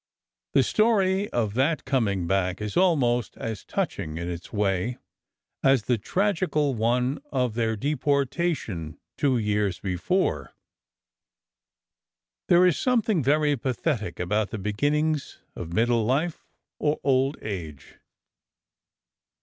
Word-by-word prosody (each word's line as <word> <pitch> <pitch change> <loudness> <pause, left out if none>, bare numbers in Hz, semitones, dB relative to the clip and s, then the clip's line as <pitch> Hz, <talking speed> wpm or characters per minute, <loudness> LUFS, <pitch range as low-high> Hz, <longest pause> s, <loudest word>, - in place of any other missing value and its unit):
The - - +5
story 200 - +2
of 110 -4 -1
that 140 +5 +1
coming 110 -9 0
back 90 0 0
is 105 -1 -4
almost 130 - +2
as 110 -4 -5
touching 80 +1 -3
in 85 +1 -4
its 85 0 -6
way 100 +3 0 0.6
as 135 -4 +4
the 120 -1 0
tragical 165 - 0
one 125 +3 0
of 125 -3 0
their 110 -1 0
depor 140 +2 +1
tation 125 - -3 0.2
two 140 -4 +2
years 105 -4 0
before. 95 - -1 1.9
There 180 +1 +6
is 180 -4 +3
something 225 -8 +2
very 145 +2 +2
pathetic 120 - -2
about 105 +4 0
the - - -5
beginnings 145 +9 -1 0.2
of 85 - -6
middle 115 +4 +2
life 145 +9 -1 0.3
or 150 0 0
old 135 +1 +2
age. 80 -9 -7
125 Hz, 115 wpm, -26 LUFS, 105-150 Hz, 1.9 s, There